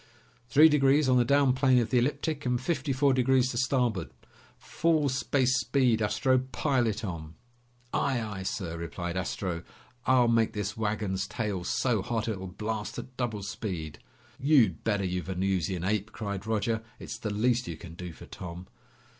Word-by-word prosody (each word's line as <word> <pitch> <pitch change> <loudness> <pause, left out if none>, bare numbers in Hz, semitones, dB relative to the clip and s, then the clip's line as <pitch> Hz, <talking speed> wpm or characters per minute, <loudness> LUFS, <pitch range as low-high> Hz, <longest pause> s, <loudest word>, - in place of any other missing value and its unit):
"Three 150 +4 +8
degrees 145 -1 +4
on 130 -1 +4
the - - +5
down 140 +1 +4
plane 130 -1 +3
of 120 0 +1
the 125 - +4
ecliptic, 145 +3 -1
and 125 -1 0
fifty 150 +1 -1
four 135 +1 +3
degrees 130 0 +3
to 120 - -4
starboard. 125 - 0 0.5
Full 160 -4 +1
space 130 -1 +1
speed, 120 -2 +2
Astro! 130 +5 +2
Pile 130 -1 0
it 110 +1 -2
on!" 80 -4 -6 0.6
"Aye, 135 -3 +1
aye, 105 -4 -5
sir!" 90 -3 -3
replied 85 +1 -4
Astro. 90 -2 -2 0.5
"I'll 130 -2 +5
make 115 -1 +2
this 105 0 -3
wagon's 105 -3 -1
tail 105 -6 -3
so 115 +3 +1
hot 115 +3 -2
it'll 95 -4 -3
blast 105 +3 -4
at 130 - -8
double 115 -5 -2
speed!" 90 -7 -5 0.4
"You'd 130 - +3
better, 105 -3 0
you 90 0 -1
Venusian 95 -1 -1
ape!" 105 +2 -1
cried 100 -2 -5
Roger. 110 +1 0 0.2
"It's - - -7
the 110 - -3
least 120 +4 +1
you 80 - -5
can 85 0 -10
do 90 +1 -7
for - - -12
Tom!" 90 0 -8
110 Hz, 170 wpm, -29 LUFS, 95-130 Hz, 0.6 s, Three